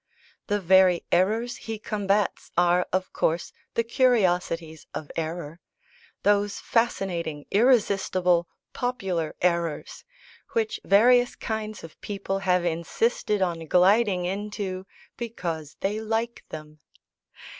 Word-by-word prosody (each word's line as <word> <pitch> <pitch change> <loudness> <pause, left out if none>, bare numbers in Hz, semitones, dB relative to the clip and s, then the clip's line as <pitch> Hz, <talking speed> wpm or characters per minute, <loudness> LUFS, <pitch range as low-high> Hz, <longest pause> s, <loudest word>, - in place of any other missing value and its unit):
The 205 0 +1
very 185 -1 +4
errors 220 +7 +1
he 225 -1 -5
combats 205 -1 -1
are, 175 0 +3
of 185 0 -1
course, 165 +2 0 0.2
the 230 - +2
curiosities 180 - +1
of 150 - -6
error 165 0 -4 0.6
those 205 0 +2
fascinating, 175 -10 -1
irresistible, 195 -6 +3 0.3
popular, 190 -10 -2
errors, 170 -3 -1 0.5
which 225 -1 0
various 245 +5 +5
kinds 215 -1 -4
of 165 - -12
people 195 -1 -3
have 180 -2 +1
insisted 190 +5 0
on 165 -3 -2
gliding 185 +1 +4
into 195 -1 -4 0.3
because 170 - -5
they 205 +2 -1
like 225 +2 -2
them. 155 0 -9
190 Hz, 105 wpm, -26 LUFS, 170-215 Hz, 0.6 s, various